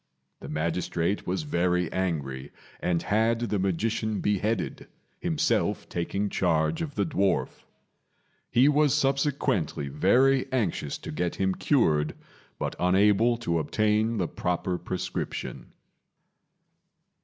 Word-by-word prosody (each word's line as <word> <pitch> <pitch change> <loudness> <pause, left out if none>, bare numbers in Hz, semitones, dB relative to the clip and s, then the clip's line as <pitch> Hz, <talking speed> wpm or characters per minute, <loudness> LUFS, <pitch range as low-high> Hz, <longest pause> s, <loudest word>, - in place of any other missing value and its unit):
The - - -9
magistrate 85 +4 -1
was 95 +10 -1
very 90 - 0
angry 70 -7 -2 0.3
and 85 -2 0
had 110 +2 +2
the 110 -4 -1
magician 110 +4 -1
beheaded, 105 +2 -1 0.3
himself - - 0
taking 95 +4 -2
charge 90 - +1
of 150 -3 -4
the - - +1
dwarf. 100 - 0 0.8
He 125 +4 +4
was 150 -1 +4
subsequently 135 - 0
very 130 - +3
anxious 100 - -1
to - - -8
get 85 +3 -2
him 95 -1 +1
cured, 80 - +2 0.4
but - - -3
unable 105 +6 +4
to 85 -1 +1
obtain 110 +7 +1
the 90 -4 0
proper 90 +1 -2
prescription. 90 +1 -5
95 Hz, 110 wpm, -27 LUFS, 85-115 Hz, 0.8 s, He